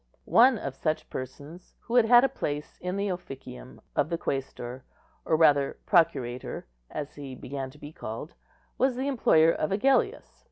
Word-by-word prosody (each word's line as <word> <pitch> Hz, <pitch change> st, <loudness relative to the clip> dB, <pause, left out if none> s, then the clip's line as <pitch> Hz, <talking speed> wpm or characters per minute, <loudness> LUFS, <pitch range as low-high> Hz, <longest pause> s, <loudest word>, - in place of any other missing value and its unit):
One 250 Hz, +1 st, +6 dB
of 135 Hz, -9 st, -5 dB
such 155 Hz, +3 st, -2 dB
persons, 145 Hz, +7 st, -8 dB
who 235 Hz, -, -8 dB
had 245 Hz, -2 st, +6 dB
had 240 Hz, +2 st, +7 dB
a -, -, +5 dB
place 150 Hz, -, -5 dB
in 180 Hz, +2 st, -3 dB
the 200 Hz, 0 st, -1 dB
officium 135 Hz, -8 st, -8 dB
of -, -, +1 dB
the 170 Hz, -, -1 dB
quæstor, 130 Hz, -3 st, -4 dB, 0.4 s
or 160 Hz, -, +2 dB
rather 145 Hz, -3 st, +4 dB
procurator, 130 Hz, -, +1 dB, 0.2 s
as 150 Hz, -1 st, -5 dB
he 140 Hz, -3 st, -8 dB
began 135 Hz, +1 st, -5 dB
to 140 Hz, -, -16 dB
be 145 Hz, 0 st, -10 dB
called, 115 Hz, +8 st, -7 dB, 0.5 s
was 260 Hz, 0 st, +2 dB
the 260 Hz, +2 st, -2 dB
employer 165 Hz, -, +4 dB
of 155 Hz, -, -1 dB
Agellius. 270 Hz, -, +1 dB
155 Hz, 165 wpm, -28 LUFS, 135-220 Hz, 0.5 s, had